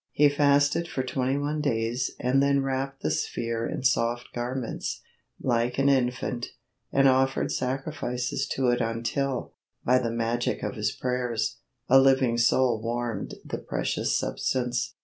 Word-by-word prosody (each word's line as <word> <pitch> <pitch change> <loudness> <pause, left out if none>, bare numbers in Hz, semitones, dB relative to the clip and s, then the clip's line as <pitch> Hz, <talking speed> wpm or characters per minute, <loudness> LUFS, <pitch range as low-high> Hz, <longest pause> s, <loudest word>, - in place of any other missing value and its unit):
He 145 0 +5
fasted 145 +3 +3
for 130 -5 -2
twenty 130 +1 -1
one 150 +1 -1
days 120 -2 0
and 130 +2 +2
then 140 0 +3
wrapped 135 0 -3
the - - +1
sphere 115 -1 -2
in - - -4
soft 120 -2 +1
garments, 120 0 -3 0.4
like 120 0 0
an 135 +1 +3
infant, 125 -2 0 0.4
and 135 0 +4
offered 135 0 +2
sacrifices 130 -1 -2
to 130 -2 +2
it 120 0 +2
until, 120 +4 -2 0.3
by 125 +1 +4
the 120 -2 -1
magic 115 +1 -1
of - - -2
his 105 -3 -1
prayers, 125 -2 -2 0.3
"a 135 - +7
living 130 -3 +3
soul 120 -1 +3
warmed 115 -2 -3
the - - -4
precious - - -1
substance." 120 - -1
125 Hz, 145 wpm, -27 LUFS, 120-135 Hz, 0.4 s, a